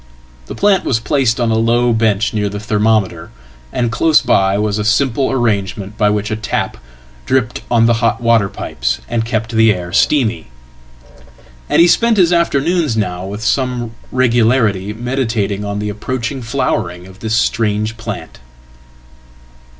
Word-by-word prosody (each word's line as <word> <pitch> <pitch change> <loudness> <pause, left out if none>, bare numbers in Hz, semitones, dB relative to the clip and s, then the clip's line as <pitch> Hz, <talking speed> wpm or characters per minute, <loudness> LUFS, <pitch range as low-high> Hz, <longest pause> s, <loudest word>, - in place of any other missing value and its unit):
The - - -7
plant 200 -2 +2
was 115 - 0
placedon 120 -3 0
a 110 - +2
low 120 +1 +2
bench 110 -1 +1
near 105 -2 -1
the 105 +1 -5
thermometer, 105 -5 0 0.4
and 120 -2 -1
close 155 +7 +4
by 95 0 +2
was 105 0 -1
a - - -1
simple 130 +4 +1
arrangementby 105 -3 0
which 105 +1 -2
a - - 0
tap 110 0 -3 0.5
dripped 130 -3 0
on 115 -1 +3
the 120 - +4
hot 115 - +1
water 115 -4 +2
pipes - - -3
and 115 -1 -1
kept 110 -1 -2
the 110 -1 +4
air 90 -3 -4
steamy. 120 -7 +1 1.2
Andhe 170 - +5
spent 230 +4 +3
his 180 -2 +4
afternoons 165 -4 +1
now 90 -3 -2
with 105 +3 -6
some 125 -1 -1 0.2
regularity 115 -5 +2
meditating 110 -4 -2
on 100 0 -3
theapproaching 115 +5 -4
flowering 115 -8 -2
of 95 +1 -15
this 110 0 -1
strange 110 -1 0
plant. 115 - -7
115 Hz, 140 wpm, -16 LUFS, 105-125 Hz, 1.2 s, Andhe